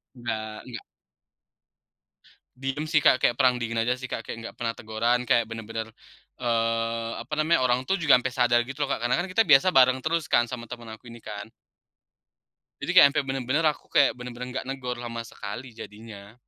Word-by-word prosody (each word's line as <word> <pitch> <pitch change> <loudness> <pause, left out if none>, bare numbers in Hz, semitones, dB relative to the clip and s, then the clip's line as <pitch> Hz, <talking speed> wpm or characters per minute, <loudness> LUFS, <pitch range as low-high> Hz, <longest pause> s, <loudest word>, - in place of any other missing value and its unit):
Enggak 110 -3 -5
enggak. - - -8 1.7
Diam 135 +3 -3
sih 155 -1 +2
Kak, 135 - +5
kayak 120 +3 +2
perang 130 -2 +4
dingin 115 -1 -3
aja 120 +2 +1
sih 130 0 -9
Kak, - - -5
kayak - - -5
nggak - - -8
pernah 115 -1 -2
teguran, 115 +2 0
kayak 115 -2 +2
benar-benar, 115 0 -6 0.5
eee, 115 -1 -1
apa - - -9
namanya, 155 -4 +3
orang 125 0 +2
tuh 195 - +2
juga 155 -8 +5
sampai 130 0 -4
sadar 120 -1 +3
gitu 145 +2 -3
loh 140 - -2
Kak, - - -1
karena 125 - +2
kan - - -5
kita 225 +4 +4
biasa 140 +5 +6
bareng 130 -2 +4
terus 165 0 -1
kan, 120 - +4
sama 120 -2 -6
teman 120 -2 -9
aku 110 +2 -12
ini 115 -1 -12
kan. 105 +1 -8 1.3
Jadi - - -2
kayak - - +10
sampe 150 - +2
benar-benar 135 +4 0
aku - - -28
kayak 135 -4 +4
benar-benar 125 0 -7
nggak 130 - -5
negur 125 -2 -4
sama 115 -1 -5
sekali 115 +3 -8
jadinya. 105 -1 -11
120 Hz, 190 wpm, -26 LUFS, 115-130 Hz, 1.7 s, kayak